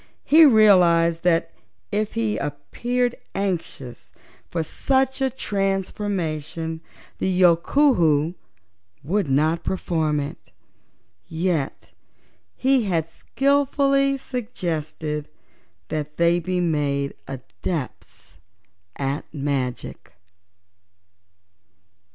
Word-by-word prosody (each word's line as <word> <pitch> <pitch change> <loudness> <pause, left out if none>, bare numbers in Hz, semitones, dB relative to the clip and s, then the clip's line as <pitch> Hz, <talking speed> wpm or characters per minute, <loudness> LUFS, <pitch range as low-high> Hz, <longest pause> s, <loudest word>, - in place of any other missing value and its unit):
He 315 +1 +7
realized 175 -8 +5
that 170 -1 +2 0.4
if 210 0 -1
he 110 -2 0
appeared 240 - -2 0.2
anxious 175 -10 -4 0.4
for 165 -2 -1
such 265 - 0
a 265 - +2
transformation 185 - -2 0.4
the - - 0
Yookoohoo 170 - +4 0.7
would 180 +2 0
not 155 +5 +2
perform 160 -5 0
it, 140 0 -7 0.8
yet 160 -4 -2 0.6
he 260 -3 +2
had 165 -5 0
skillfully 275 - +1
suggested 160 - -4 0.6
that 150 -1 -4
they 170 +1 +3
be 180 +2 -2
made 145 -5 0
Adepts 130 - -6 0.6
at 140 +1 -3
Magic. 135 -4 -4
170 Hz, 80 wpm, -23 LUFS, 150-215 Hz, 0.8 s, He